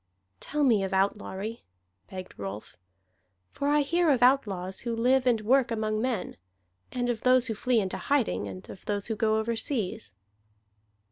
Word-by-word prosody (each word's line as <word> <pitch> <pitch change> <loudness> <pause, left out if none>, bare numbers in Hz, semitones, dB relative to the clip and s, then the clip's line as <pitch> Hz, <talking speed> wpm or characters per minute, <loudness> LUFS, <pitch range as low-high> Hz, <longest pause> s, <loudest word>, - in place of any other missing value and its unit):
"Tell 300 0 -2
me 225 -7 +4
of 190 0 -3
outlawry," 200 +3 -1 0.5
begged 185 -1 -8
Rolf. 100 +1 -7 0.8
"For 280 - -3
I 295 0 +4
hear 335 +4 +2
of 255 -4 +3
outlaws 195 -8 +2
who 235 -1 -3
live 255 +3 +2
and 235 -3 +3
work 250 +3 +3
among 215 -1 -1
men, 245 -5 -2 0.5
and 245 -1 -1
of 240 -2 -2
those 255 0 +4
who 230 - -1
flee 240 +2 +1
into 190 -3 -2
hiding, 270 - 0
and 95 -1 -9
of - - -11
those 205 -1 -2
who 225 - -1
go 220 0 +2
overseas." 220 - -2
225 Hz, 160 wpm, -28 LUFS, 195-255 Hz, 0.8 s, me